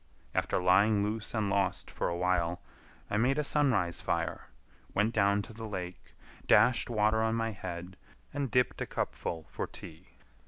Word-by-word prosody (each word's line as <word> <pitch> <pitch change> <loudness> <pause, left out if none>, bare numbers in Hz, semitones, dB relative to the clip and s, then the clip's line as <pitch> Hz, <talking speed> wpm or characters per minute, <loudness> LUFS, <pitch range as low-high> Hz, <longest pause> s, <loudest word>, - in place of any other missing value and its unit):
After - - 0
lying 100 +3 +4
loose 110 +2 -2
and 110 -2 +1
lost 100 -2 0
for - - -2
awhile, 85 -1 0 0.5
I 105 - +1
made 130 +5 +2
a 150 - +1
sunrise 130 - +2
fire, - - -2 0.5
went 105 +3 +2
down 100 -1 +3
to 110 - -10
the 110 0 -7
lake, 90 -3 -7 0.3
dashed 125 -1 +5
water 110 -1 +2
on 110 0 +1
my 115 0 -1
head, 90 -2 -7 0.4
and 140 -2 -2
dipped 125 +1 +1
a - - -2
cupful 80 -2 -3
for - - -4
tea. 80 +4 -11
105 Hz, 160 wpm, -31 LUFS, 90-115 Hz, 0.5 s, dashed